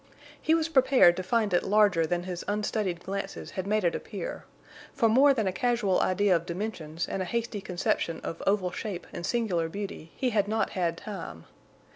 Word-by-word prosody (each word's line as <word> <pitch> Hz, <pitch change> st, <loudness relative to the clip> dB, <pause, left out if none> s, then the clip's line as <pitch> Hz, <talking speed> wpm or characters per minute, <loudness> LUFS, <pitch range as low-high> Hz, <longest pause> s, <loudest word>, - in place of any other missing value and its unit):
He 320 Hz, -, +3 dB
was 325 Hz, -1 st, +1 dB
prepared 260 Hz, -, +5 dB
to -, -, -1 dB
find 210 Hz, +1 st, 0 dB
it 175 Hz, -, +4 dB
larger 200 Hz, -5 st, +3 dB
than 175 Hz, +1 st, -1 dB
his 180 Hz, -1 st, -5 dB
unstudied 205 Hz, -4 st, -1 dB
glances 195 Hz, +1 st, -5 dB
had 190 Hz, 0 st, -4 dB
made 215 Hz, 0 st, +1 dB
it 170 Hz, -, +2 dB
appear; -, -, -6 dB, 0.5 s
for 250 Hz, -5 st, +3 dB
more 265 Hz, +6 st, +6 dB
than 230 Hz, -6 st, +1 dB
a 190 Hz, -, +1 dB
casual 235 Hz, -4 st, +1 dB
idea 185 Hz, 0 st, +3 dB
of 170 Hz, +1 st, -2 dB
dimensions 170 Hz, -4 st, -4 dB
and 195 Hz, -, -3 dB
a -, -, -1 dB
hasty 230 Hz, +1 st, -2 dB
conception 175 Hz, -3 st, -1 dB
of 165 Hz, -, -6 dB
oval 195 Hz, -2 st, +2 dB
shape 195 Hz, -2 st, -5 dB
and 170 Hz, -, -6 dB
singular 180 Hz, -8 st, 0 dB
beauty 195 Hz, -4 st, -6 dB
he 255 Hz, -2 st, 0 dB
had 205 Hz, -2 st, +2 dB
not 220 Hz, +1 st, 0 dB
had 170 Hz, -3 st, -1 dB
time. 165 Hz, -, -7 dB
195 Hz, 190 wpm, -28 LUFS, 175-220 Hz, 0.5 s, more